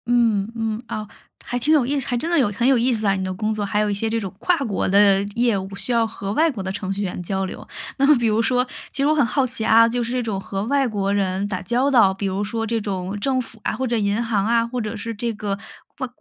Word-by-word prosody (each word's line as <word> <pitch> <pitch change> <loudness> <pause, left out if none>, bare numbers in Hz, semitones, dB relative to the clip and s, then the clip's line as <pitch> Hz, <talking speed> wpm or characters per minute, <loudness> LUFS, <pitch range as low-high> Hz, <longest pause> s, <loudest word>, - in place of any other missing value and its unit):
嗯， 230 -4 +2
嗯， 225 -1 -2
哦。 215 -1 -5 0.4
还 245 - -3
挺 290 +6 +2
有 295 -4 +5
意 285 +1 0
思 265 - -5
还 245 - 0
真 280 +8 -2
的 340 - +2
有 260 -8 +3
很 235 +5 0
有 270 -1 +5
意 245 +2 +2
思 215 -2 0
啊， 195 - +4
你 190 0 -2
的 185 0 -2
工 215 +3 -2
作， 215 -1 -2
还 205 +1 0
有 210 0 +1
一 - - 0
些 225 +3 -1
这 225 +1 0
种 195 -4 -5
跨 360 - +2
国 225 -8 -1
的 200 0 +5
业 235 -3 +2
务 195 +1 -6
需 195 +5 -1
要 230 -1 +3
和 200 -3 -5
外 320 +6 +3
国 225 -7 -6
的 190 0 -3
程 195 0 -3
序 200 - -4
员 180 -2 -3
交 190 +2 -1
流。 185 - -8 0.3
那 275 - +3
么 300 - +7
比 240 -2 +1
如 220 +1 +2
说 250 +1 +2 0.3
其 - - -8
实 280 - +3
我 305 - +3
很 290 - +4
好 260 +4 +1
奇 245 -3 -3
啊， 230 +1 +6
就 240 +1 -1
是 235 - -4
这 255 0 0
种 215 -5 -2
和 195 0 -4
外 275 +2 +2
国 200 -3 -1
人 195 0 0
打 190 -3 -3
交 245 +8 +1
道， 230 -8 +5
比 195 +1 -3
如 195 +2 -1
说 225 +2 -2
这 230 +1 0
种 195 -1 -4
政 260 +3 +1
府 230 -2 -10
啊， - - -1
或 260 - -2
者 235 -1 0
银 205 +2 0
行 215 -4 0
啊， 230 +1 +2
或 250 +1 -3
者 215 -1 -3
是 225 +2 -5
这 230 +2 -2
个 205 -2 -3 0.4
外 260 - -3
225 Hz, 315 characters per minute, -22 LUFS, 200-245 Hz, 0.4 s, 么